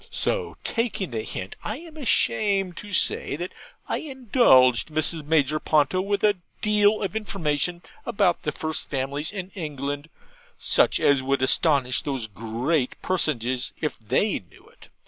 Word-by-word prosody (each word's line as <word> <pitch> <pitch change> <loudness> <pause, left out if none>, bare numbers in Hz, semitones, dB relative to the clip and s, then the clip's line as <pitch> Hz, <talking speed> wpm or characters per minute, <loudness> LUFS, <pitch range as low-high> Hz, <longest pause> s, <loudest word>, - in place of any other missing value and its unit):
So, 485 -3 -1
taking 225 - -2
the 110 -2 -2
hint, 95 -3 -6
I 215 - -3
am 325 0 -12
ashamed 200 - +1
to 210 - -8
say 145 -5 +1 0.5
I - - -1
indulged 240 - +4
Mrs. 155 0 -1
Major 155 -1 +2
Ponto 155 +5 +2
with 200 +1 -1
a 205 -2 +4 0.2
deal 210 0 +3
of 195 - -3
information 175 -5 -1 0.2
about 200 -7 +1
the 150 - -2
first 155 +1 -3
families 140 +2 -2
in 190 -2 -6
England, 145 -3 -5 0.5
such - - +4
as 140 -2 +3
would 135 0 0
astonish 130 -2 +3
those 135 -5 -2
great 115 +7 -2
personages 130 -8 0
if 150 - -3
they 150 - 0
knew 90 - -21
it. - - -18
155 Hz, 145 wpm, -25 LUFS, 135-205 Hz, 0.5 s, indulged